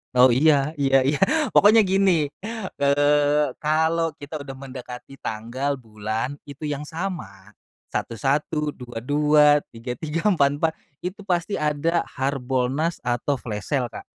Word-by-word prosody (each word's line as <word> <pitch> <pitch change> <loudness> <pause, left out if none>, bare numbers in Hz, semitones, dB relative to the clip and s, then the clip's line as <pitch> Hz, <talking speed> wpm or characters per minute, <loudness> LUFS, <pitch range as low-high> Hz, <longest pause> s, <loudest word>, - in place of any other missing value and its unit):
Oh, 125 -1 +7
iya 145 +2 +3
iya 135 -3 +3
iya. 145 +6 0 0.3
Pokoknya 215 +1 +6
gini, 190 -5 +3 0.6
eee, 145 +1 +3 0.2
kalau 160 +2 +2
kita 145 +1 -7
udah 135 -1 -8
mendekati 130 -1 -9
tanggal 125 +6 -3
bulan 110 +2 -4 0.2
itu 140 +2 -7
yang 145 -1 -3
sama 115 - -6 0.4
satu 115 - -3
satu, 145 +5 0
dua 120 -2 -9
dua, 150 +1 +4 0.2
tiga 115 +2 -6
tiga, 160 - -4
empat 145 -8 +3
empat, 160 +1 +1 0.3
itu 190 +3 -5
pasti 180 +1 -1
ada 150 +3 +1 0.2
harbolnas 135 +4 -1
atau 125 +3 0
flash 105 -4 -6
sale, 135 -4 +1
Kak. 120 - -8
145 Hz, 135 wpm, -23 LUFS, 125-160 Hz, 0.6 s, Oh